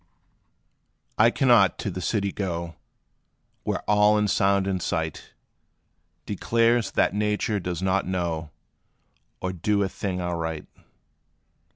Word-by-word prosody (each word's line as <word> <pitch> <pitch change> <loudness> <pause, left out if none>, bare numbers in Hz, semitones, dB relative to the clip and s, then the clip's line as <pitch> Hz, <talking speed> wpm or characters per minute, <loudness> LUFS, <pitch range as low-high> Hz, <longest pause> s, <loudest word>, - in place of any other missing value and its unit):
I 110 +2 +7
cannot 120 -6 +4
to 100 - -3
the 90 - -5
city 100 0 0
go, 85 -4 -4 0.9
Where - - -3
all 105 0 +4
in 105 0 +2
sound 100 0 +2
and 95 -2 -1
sight, 80 -2 -3 0.9
Declares 115 +3 +1
that - - +2
nature 105 0 0
does 90 -1 -4
not 95 0 +1
know, 85 -4 -2 0.9
Or 95 0 -2
do 100 +4 +1
a 95 - -1
thing 95 -1 -4
aright. 85 -3 -3
95 Hz, 115 wpm, -25 LUFS, 90-105 Hz, 0.9 s, I